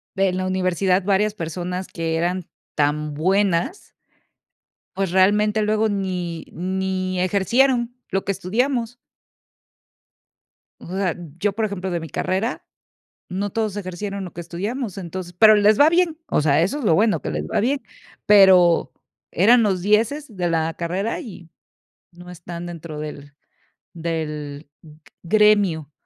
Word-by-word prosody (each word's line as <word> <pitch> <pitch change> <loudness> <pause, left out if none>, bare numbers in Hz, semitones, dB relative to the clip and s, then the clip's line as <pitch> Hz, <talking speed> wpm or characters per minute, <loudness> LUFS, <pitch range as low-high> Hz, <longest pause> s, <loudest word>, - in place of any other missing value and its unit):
en 190 -2 +1
la 185 - -2
universidad 185 0 +1
varias 205 +2 +1
personas 180 0 -4
que 165 -1 -3
eran 175 +2 -1 0.3
tan 150 0 0
buenas 190 - 0 1.0
pues, 195 -2 -1
realmente, 210 +3 +3
luego 215 +1 +1
ni 180 -5 -3
ni 185 +1 -2
ejercieron 235 +6 +2
lo 195 0 -2
que 195 - 0
estudiamos. 240 +5 -1 1.8
O - - -12
sea, 185 -1 -1 0.2
yo, 205 +2 0
por 220 +1 -1
ejemplo, 190 -3 -3
de 170 -1 -2
mi 160 - -7
carrera, 190 - -2 0.7
no 195 +2 -3
todos 215 -1 -2
ejercieron 195 +1 -5
lo 180 - -9
que 175 - -7
estudiamos. 200 +6 -4
Entonces 180 0 -6
pero 215 +1 +8
les 210 0 +4
va 290 - +7
bien, 335 -1 +1
o - - +1
sea, 145 0 +3
eso 200 +12 0
es 280 - -5
lo 165 - +4
bueno 210 +5 +2
que - - -3
les 75 0 -3
va - - 0
bien, 270 +5 0 0.4
pero 190 -4 +6 0.4
eran 230 +8 +5
los 190 -4 0
dieces 225 +6 +1
de 175 -2 -1
la 165 0 0
carrera, 185 +6 -2
y 180 -7 -11 0.6
no 175 +1 -13
están 170 0 -8
dentro 165 -3 -7
del 145 -1 -8 0.6
del 150 -3 -5
g 155 -1 -16 0.2
gremio, 200 -6 +3
185 Hz, 145 wpm, -22 LUFS, 170-210 Hz, 1.8 s, pero